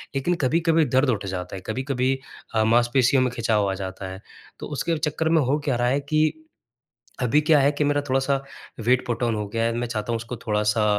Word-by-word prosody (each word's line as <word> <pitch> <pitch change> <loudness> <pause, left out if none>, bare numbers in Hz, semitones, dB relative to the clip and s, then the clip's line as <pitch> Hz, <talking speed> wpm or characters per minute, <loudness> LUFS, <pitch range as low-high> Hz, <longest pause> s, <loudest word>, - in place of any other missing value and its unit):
लेकिन 175 +6 +1
कभी-कभी 165 +3 +3
दर्द 130 +2 +2
उठ 105 -5 -1
जाता 90 -1 -5
है, 95 - -7
कभी-कभी 130 +2 -1 0.4
अ, 110 - +3
मांसपेशियों 120 +3 +3
में 125 - 0
खिंचाव 110 -4 +1
आ - - -1
जाता 95 0 -6
है। 95 +2 -9 0.4
तो - - -6
उसके 165 +2 0
चक्कर 155 +1 -1
में 160 -1 +4
हो 140 +3 +1
क्या 135 - +1
रहा 120 0 +1
है 135 +3 +2
कि 155 +2 +1 0.9
अभी 130 +5 +3
क्या 150 0 +4
है 140 - +4
कि 150 - -1
मेरा 145 0 +2
थोड़ा-सा 135 +1 +1 0.4
वेट 125 +1 +3
पुट 120 0 -2
ऑन 115 -1 +1
हो 105 -1 -3
गया 115 +2 -1
है। 115 - +1
मैं 120 - -1
चाहता 110 0 -3
हूँ, 115 - +1
उसको 115 +2 -6
थोड़ा-सा 105 0 +1
125 Hz, 220 wpm, -24 LUFS, 110-145 Hz, 0.9 s, में